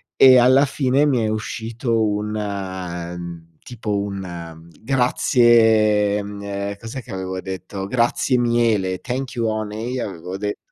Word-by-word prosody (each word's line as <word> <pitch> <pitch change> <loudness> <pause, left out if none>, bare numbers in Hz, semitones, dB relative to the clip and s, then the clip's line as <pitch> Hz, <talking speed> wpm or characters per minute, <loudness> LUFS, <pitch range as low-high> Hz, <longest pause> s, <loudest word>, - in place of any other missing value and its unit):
e 130 -1 +8
alla 130 +3 +5
fine 135 0 +1
mi 135 -4 +2
è - - +1
uscito 115 +1 -2
un, 105 +1 -2
ehm, 90 -4 -5
tipo 105 -4 -3
un 85 -5 -6
grazie, 115 -5 +3
ehm, 100 0 -5
cos'è 115 +4 -7
che - - -12
avevo 95 0 -4
detto? 95 +1 -6
"Grazie 125 +2 +1
miele, 115 -6 +1
"thank 130 0 -4
you 115 - -1
honey" 110 +3 -3
avevo 90 -3 -5
detto, 105 0 -3
105 Hz, 130 wpm, -21 LUFS, 95-120 Hz, -, e